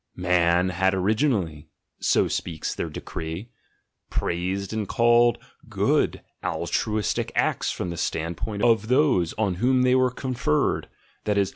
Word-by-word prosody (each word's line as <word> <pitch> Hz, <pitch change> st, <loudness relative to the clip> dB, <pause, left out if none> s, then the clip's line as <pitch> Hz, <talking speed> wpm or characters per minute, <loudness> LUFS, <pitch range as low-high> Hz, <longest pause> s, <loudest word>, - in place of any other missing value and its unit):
*' -, -, -35 dB
'•'Man 90 Hz, 0 st, +2 dB
had 95 Hz, +1 st, +1 dB
originally,'' 95 Hz, -, 0 dB, 0.3 s
so -, -, +2 dB
speaks 80 Hz, -3 st, -3 dB
their 85 Hz, -, -4 dB
decree, 80 Hz, +7 st, -6 dB, 0.6 s
"praised 95 Hz, +4 st, -2 dB
and 110 Hz, -2 st, -2 dB
called 120 Hz, +1 st, +4 dB, 0.3 s
'good' -, -, +1 dB, 0.2 s
altruistic 105 Hz, -1 st, -1 dB
acts -, -, +1 dB
from 90 Hz, -, -3 dB
the 85 Hz, -, -6 dB
standpoint 85 Hz, +7 st, -3 dB
of 115 Hz, -3 st, +3 dB
those 125 Hz, -, +3 dB
on 105 Hz, -4 st, +1 dB
whom 130 Hz, +1 st, +3 dB
they 125 Hz, 0 st, +4 dB
were 130 Hz, 0 st, +4 dB
conferred, 125 Hz, -, -1 dB, 0.4 s
that 105 Hz, -1 st, +1 dB
is. 100 Hz, -2 st, +2 dB
100 Hz, 135 wpm, -25 LUFS, 85-120 Hz, 0.6 s, called